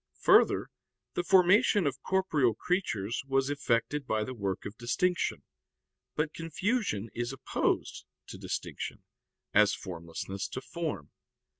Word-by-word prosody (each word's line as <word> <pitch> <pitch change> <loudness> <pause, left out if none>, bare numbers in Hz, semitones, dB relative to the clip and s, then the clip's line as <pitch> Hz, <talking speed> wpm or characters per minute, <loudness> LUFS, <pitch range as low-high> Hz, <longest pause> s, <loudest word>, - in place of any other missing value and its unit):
Further, - - +5 0.4
the - - 0
formation 190 +2 +5
of 140 -2 -1
corporeal 155 - +2
creatures 115 - -1
was 135 +1 +1
effected 140 0 0
by 110 -1 +1
the 130 - -5
work 100 -5 -3
of 100 - -6
distinction. 170 - 0 0.7
But 150 0 -1
confusion 165 - -1
is 120 +1 -2
opposed 135 - -1 0.2
to - - -8
distinction, - - -5 0.5
as 105 -2 +5
formlessness 90 +2 -5
to 130 - -6
form. 155 - -5
135 Hz, 120 wpm, -30 LUFS, 105-175 Hz, 0.7 s, Further